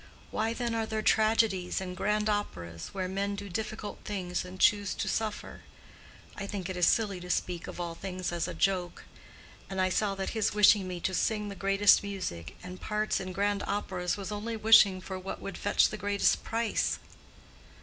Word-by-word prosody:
Why 220 +1 0
then 235 0 -2
are 225 -1 -1
there 220 0 -2
tragedies 215 -4 +2
and 180 -1 -5
grand 210 +2 0
operas, 85 - -3
where 190 -2 -3
men 200 +2 -2
do 200 0 -7
difficult 220 +2 -4
things 180 -4 -3
and 185 +1 -10
choose 205 -1 +3
to - - -3
suffer? 215 -2 -3 0.7
I 195 - -5
think 195 -3 -4
it - - -5
is 180 -1 +3
silly 205 -5 +2
to 180 0 -9
speak 180 -1 -1
of - - -8
all 170 -1 -3
things 185 0 -4
as 170 -1 -1
a - - -5
joke. 180 0 0 0.6
And 190 -1 -4
I 185 0 +3
saw 200 +1 0
that 195 0 -3
his 220 -2 0
wishing 210 -2 +6
me 180 -1 -5
to 190 - -1
sing 210 +2 0
the 200 - -6
greatest 195 +1 +5
music, 185 - -5
and 180 0 -8
parts 215 0 0
in 185 -1 -5
grand 200 +1 0
operas, 185 -2 -2
was 195 0 -5
only 220 +2 -3
wishing 210 -4 +6
for 190 0 -6
what 190 +1 -6
would 195 - -6
fetch 205 - +3
the 215 - -5
greatest 200 0 +2
price. 230 -1 0
195 Hz, 190 wpm, -30 LUFS, 185-210 Hz, 0.7 s, wishing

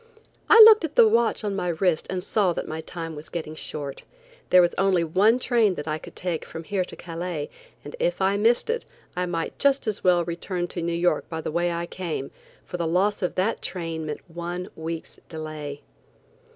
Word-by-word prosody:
I 445 - +8
looked 435 -3 +9
at 310 -2 -3
the 230 - +7
watch 230 +1 +2
on 205 -2 -2
my 180 - -2
wrist 170 -1 0
and 185 -1 -3
saw 195 -4 +1
that - - -4
my 160 +1 -4
time 165 0 -6
was 150 +1 -10
getting 160 -3 -5
short. 145 -3 -4 0.5
There 185 - +7
was 175 -1 +4
only 190 -3 +2
one 195 +8 +3
train 230 -6 +2
that 145 -1 -6
I 155 0 -2
could - - -12
take 175 -3 -3
from 165 - -8
here 190 +2 -1
to - - -9
Calais, 170 -3 -5 0.3
and - - -7
if - - 0
I 195 +1 +2
missed 230 - +2
it 470 - -2 0.3
I 180 0 -1
might 165 -2 -3
just 280 -1 +3
as 215 -3 -2
well 175 -2 +4
return 175 +1 -3
to 175 - -4
New 170 +1 -1
York 170 +1 0
by 160 - -4
the 160 - -4
way 175 +2 0
I 170 0 -2
came, 170 -6 -5 0.3
for 180 - -5
the 170 -1 -1
loss 195 +5 +1
of 180 - -1
that 190 +5 0
train 165 -3 -4
meant 150 - -6
one 175 +2 -5
week's 160 0 -6
delay. 155 -3 -6
175 Hz, 210 wpm, -25 LUFS, 165-195 Hz, 0.5 s, looked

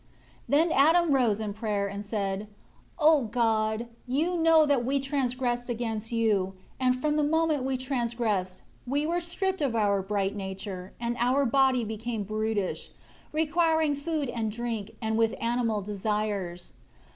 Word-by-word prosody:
21 305 +4 +4
Then - - 0
Adam 325 +3 +5
rose 240 -6 +3
up 220 - -3
in 205 - -3
prayer 210 -2 -1
and 200 +1 -5
said, 200 -1 -2 0.5
"O 305 -4 +5
God, 220 -1 +1 0.2
you 310 +8 0
know 325 -2 +5
that 280 -4 +2
we 275 +3 +1
transgressed 255 -3 -1
against 225 -2 -3
you, 210 -5 +1 0.2
and 255 -1 +2
from 300 +2 +1
the 300 - +2
moment 310 -2 +1
we 265 0 -1
transgressed, 235 -7 -2 0.2
we 285 +4 0
were 340 +2 0
stripped 375 +1 -2
of 265 -5 0
our 200 -3 +2
bright 200 0 -1
nature; 190 -1 -6
and 235 0 -2
our 255 +4 +3
body 265 0 +3
became 220 0 -3
brutish, 215 -1 -2 0.4
requiring 320 0 +2
food 295 0 -2
and 225 -3 -2
drink; 225 -2 -4
and 220 0 0
with 225 -1 +2
animal 230 -2 0
desires. 205 -3 -3
235 Hz, 155 wpm, -28 LUFS, 210-280 Hz, 0.5 s, Adam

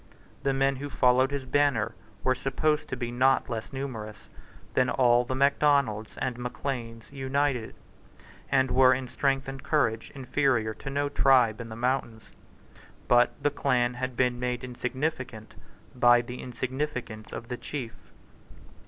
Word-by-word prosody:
The 140 - +1
men 135 0 +1
who 145 +2 -5
followed 130 0 +3
his 140 -2 -4
banner 135 -5 +1 0.3
were 130 - +3
supposed 150 +4 -1
to - - -2
be 120 -1 -3
not 130 +2 +2
less 110 -1 -4
numerous 120 -6 -6 0.4
than 125 -1 +2
all 120 -2 +4
the 130 - -3
Macdonalds 140 -5 +2
and 125 -1 -3
Macleans 120 -2 -5
united, 135 -3 -1 0.8
and 130 -1 +3
were, 130 +1 +6
in 130 0 -5
strength 135 +1 0
and 135 0 -6
courage, 130 -6 0
inferior 130 -4 +1
to 135 - -8
no 145 +1 0
tribe 125 -5 +3
in 115 - -8
the 110 - -7
mountains. 120 -2 -2 0.8
But 120 0 +4
the 145 - +3
clan 125 -4 +1
had 125 0 -4
been 125 -1 +1
made 125 0 -2
insignificant 125 -2 -4 0.4
by 120 -1 +5
the 125 +1 -8
insignificance 125 -3 -4
of 115 - -7
the 125 - -3
chief. 125 -5 -5
130 Hz, 145 wpm, -27 LUFS, 120-135 Hz, 0.8 s, were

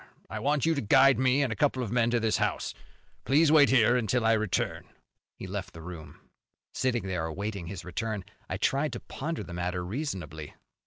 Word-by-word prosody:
I - - -3
want 145 0 +1
you 165 - +3
to 140 - -1
guide 135 +5 +5
me 130 +2 +3
and 125 -5 -1
a - - -8
couple 135 -2 +1
of 110 - -5
men 120 -1 +2
to 120 0 +2
this 110 -1 +1
house. - - -1 0.5
Please 150 +6 +4
wait 150 -3 +7
here 120 -2 +5
until 120 0 +1
I 115 - +5
return." 110 -3 -1 0.5
He - - -7
left 95 -1 -6
the 80 - -9
room. 80 -4 -9 0.5
Sitting 120 -5 0
there 90 -4 -2
awaiting 100 +2 -4
his 90 -2 -7
return, 105 +2 -3 0.3
I - - -2
tried 140 0 0
to 120 - -4
ponder 155 -3 -5
the 90 - -9
matter 90 +1 -2
reasonably. 90 - -5
115 Hz, 200 wpm, -28 LUFS, 90-130 Hz, 0.5 s, wait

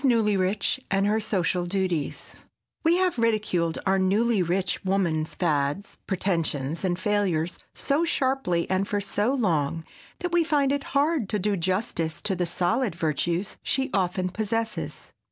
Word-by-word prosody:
NEWLYRICH 210 -4 +2
AND 195 0 +2
HER 215 +2 +2
SOCIAL 185 -4 0
DUTIES 180 -5 -2 0.5
WE 330 +1 +4
have 365 -8 +1
ridiculed 210 -8 +1
our 195 0 +3
newly 205 +3 +2
rich 180 +3 -1
woman's 175 -5 0
fads, 150 +2 -1
pretensions 165 -6 -1
and 175 -2 0
failures 185 -5 0 0.2
so 290 +4 +1
sharply 260 - 0
and 190 +1 0
for 205 - 0
so 205 +3 0
long 165 - 0 0.4
that 355 -1 -2
we 345 -1 +4
find 290 -4 +2
it 285 0 -1
hard 285 - +2
to 210 - 0
do 205 +1 0
justice 175 -3 -1
to 195 - 0
the 175 -1 -1
solid 180 +4 0
virtues 170 +4 -1
she 265 0 -1
often 185 -1 0
possesses. 225 +3 -3
195 Hz, 145 wpm, -26 LUFS, 175-225 Hz, 0.5 s, WE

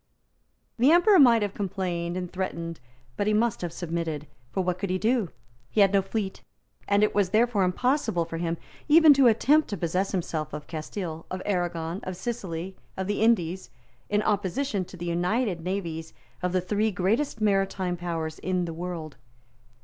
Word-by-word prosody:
The 255 +4 +5
Emperor 360 +3 +6
might 235 -5 +6
have 205 -1 -2
complained 180 -3 -3
and 180 -1 -5
threatened; 170 -3 -4 0.4
but 205 - 0
he 215 - +3
must 230 +1 +1
have 175 -2 -3
submitted; 165 -3 -3 0.2
for 190 - -1
what 180 0 -1
could 195 -1 -2
he 185 - +1
do? 220 -2 +1 0.4
He 215 - +2
had 195 0 +5
no 200 - +5
fleet; 195 0 -4 0.5
and 205 +1 +3
it 210 - +2
was 200 -3 +2
therefore 220 +1 +2
impossible 185 - +1
for 165 0 -6
him 165 0 -2 0.3
even 310 0 +8
to 270 -2 +5
attempt 285 +7 +4
to 205 - -4
possess 180 +3 -1
himself 160 -5 -3
of 150 0 -6
Castile, 165 +1 -6
of 185 - -4
Arragon, 175 -3 -1
of 185 -1 -6
Sicily, 190 -5 -4 0.2
of 190 - -2
the 205 +2 -1
Indies, 185 - +2 0.4
in 210 0 +1
opposition 205 +1 0
to 185 - -12
the 175 - -6
united 180 +3 0
navies 165 -3 -4 0.3
of 180 -1 0
the 185 0 +1
three 210 +4 0
greatest 220 +7 0
maritime 195 -3 +1
powers 165 -2 -4
in 185 -1 -1
the 165 - -5
world. 165 -3 -6
185 Hz, 175 wpm, -27 LUFS, 170-210 Hz, 0.5 s, even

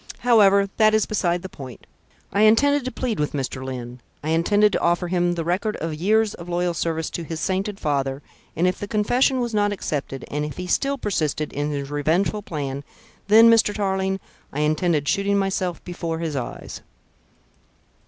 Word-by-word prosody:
However, 200 -5 +5
that 215 -1 +5
is 215 - +2
beside 175 -4 -1
the - - -4
point. 130 -9 -11 0.5
I 200 - +2
intended 280 +6 +4
to 255 - -2
plead 245 -8 -3
with 150 - -1
Mr. 135 -2 -3
Lyne. 125 -2 -7 0.2
I 155 - -3
intended 205 +6 +3
to - - 0
offer 175 +1 +1
him 175 -1 +1
the 165 - -2
record 190 +6 -1
of 165 0 -4
years 215 +7 +2
of 170 0 -10
loyal 175 0 0
service 160 -1 -2
to 170 - -4
his 160 0 -5
sainted 195 +3 -2
father; 140 -2 -1 0.3
and 170 - +1
if 180 0 0
the 205 - -5
confession 245 +6 +2
was 235 -2 -2
not 205 -1 +2
accepted, 145 -8 -4
and 150 +1 -1
if 150 -1 -5
he 180 - -4
still 275 +10 0
persisted 155 - -2
in 145 +1 -2
his 140 -1 -4
revengeful 165 +8 0
plan, 140 -7 -5 0.4
then, 220 +2 +8
Mr. 225 -2 +4
Tarling, 190 -1 -1 0.3
I 150 - -2
intended 155 -1 +1
shooting 200 0 +1
myself 190 -3 -1
before 170 -2 -4
his 160 -3 -3
eyes." 125 -3 -6
180 Hz, 185 wpm, -23 LUFS, 150-205 Hz, 0.5 s, then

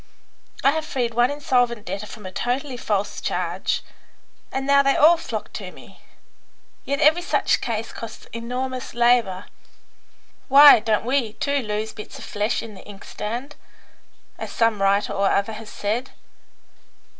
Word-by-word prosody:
"I 275 - +6
have 315 +1 -2
freed 245 -6 -2
one 240 +2 +3
insolvent 245 -6 0
debtor 200 +3 -5
from 210 -2 -11
a 185 - -6
totally 250 +6 -2
false 205 -4 -2
charge, - - -2 0.7
and 270 0 -3
now 280 0 +5
they 275 0 +2
all 320 +4 +6
flock 330 - -6
to - - -6
me. - - -16 0.9
Yet 280 0 -1
every 315 +4 +5
such 350 - +1
case 225 -1 -3
costs 225 -1 -9
enormous 250 +2 -4
labour. 235 -6 +2 1.0
Why, 285 -1 +9
don't 220 0 0
we, 250 -4 0
too, 280 +4 -1
'lose 215 -1 -3
bits 210 - -9
of - - -9
flesh 210 +2 -1
in 225 -2 -9
the 190 - -12
inkstand?' 225 +7 -6 0.8
as - - -6
some 225 -3 +1
writer 200 +1 +2
or 195 0 +1
other 200 +3 0
has 215 0 -9
said. 225 +6 -3
235 Hz, 150 wpm, -23 LUFS, 210-270 Hz, 1.0 s, Why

